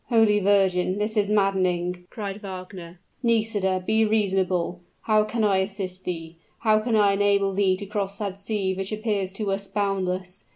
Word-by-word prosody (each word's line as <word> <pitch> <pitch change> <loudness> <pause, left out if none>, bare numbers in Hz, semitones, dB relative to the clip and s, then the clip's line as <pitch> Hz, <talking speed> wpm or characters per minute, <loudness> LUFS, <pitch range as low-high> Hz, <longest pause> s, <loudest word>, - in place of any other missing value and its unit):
"Holy 225 -3 +4
Virgin! 190 -2 +2
this 210 +2 -2
is 205 -1 +2
maddening!" 185 -3 +1
cried 205 -2 -6
Wagner. 185 -3 -8 0.2
"Nisida 215 -5 +1
be 220 +2 +3
reasonable; 190 -5 +1 0.2
how 215 -1 +3
can 220 +1 -2
I 200 -2 +3
assist 190 -1 -4
thee? 165 -2 -5 0.2
how 215 -2 +4
can 225 +1 0
I 205 -2 +4
enable 200 -1 +2
thee 190 -1 +2
to 200 - -6
cross 200 -1 -3
that 200 -3 -4
sea 200 -2 -1
which 190 +1 -4
appears 210 -3 -1
to 200 0 -2
us 195 0 -3
boundless? 190 -2 -2
195 Hz, 165 wpm, -25 LUFS, 185-210 Hz, 0.2 s, Holy